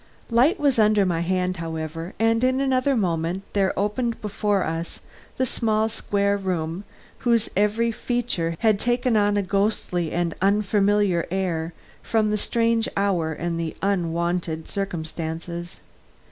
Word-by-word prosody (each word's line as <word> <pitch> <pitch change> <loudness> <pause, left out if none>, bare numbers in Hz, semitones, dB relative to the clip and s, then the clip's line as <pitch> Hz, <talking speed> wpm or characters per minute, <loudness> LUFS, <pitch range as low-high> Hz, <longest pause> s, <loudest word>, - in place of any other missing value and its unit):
Light 260 - +4
was 280 -5 +2
under 210 -2 +4
my 175 -3 0
hand, 185 +1 0
however, 165 +1 -5
and 225 +1 +2
in 255 +1 +3
another 265 0 +2
moment 175 -2 -1
there 195 -2 +2
opened 225 +4 -1
before 205 -2 0
us 165 +1 -4 0.4
the 260 - +2
small 220 -2 +1
square 200 -2 0
room 180 -1 -3 0.3
whose 235 -3 +2
every 210 +4 +2
feature 220 -9 -1
had 215 -3 +3
taken 245 0 +1
on 205 -1 +3
a 200 - +1
ghostly 195 -4 0
and 170 -1 0
unfamiliar 200 -2 +2
air 170 -3 -1 0.3
from 215 -2 +1
the 210 - +1
strange 230 +1 +1
hour 185 -5 +1
and 170 +1 -3
the 165 -1 -3
unwonted 170 -3 -1
circumstances. 170 -2 -5
200 Hz, 135 wpm, -24 LUFS, 170-220 Hz, 0.4 s, Light